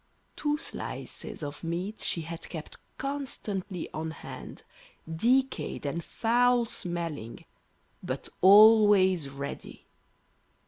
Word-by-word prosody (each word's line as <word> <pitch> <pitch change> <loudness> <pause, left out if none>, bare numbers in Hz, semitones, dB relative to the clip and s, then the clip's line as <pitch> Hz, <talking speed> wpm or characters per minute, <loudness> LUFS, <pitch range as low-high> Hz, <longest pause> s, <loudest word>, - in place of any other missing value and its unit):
Two 295 0 0
slices 300 - -5
of 145 +2 -6
meat 180 +6 -3
she 165 - -1
had 165 +1 -7
kept 160 -3 -8 0.2
constantly 215 - -4
on 160 +1 -3
hand, 160 - -9 0.4
decayed 240 - +1
and 165 +4 -2
foul 245 +1 +2
smelling, 170 - -5 0.6
but - - -4
always 200 -5 +7
ready. 140 +1 -7
185 Hz, 95 wpm, -29 LUFS, 160-225 Hz, 0.6 s, always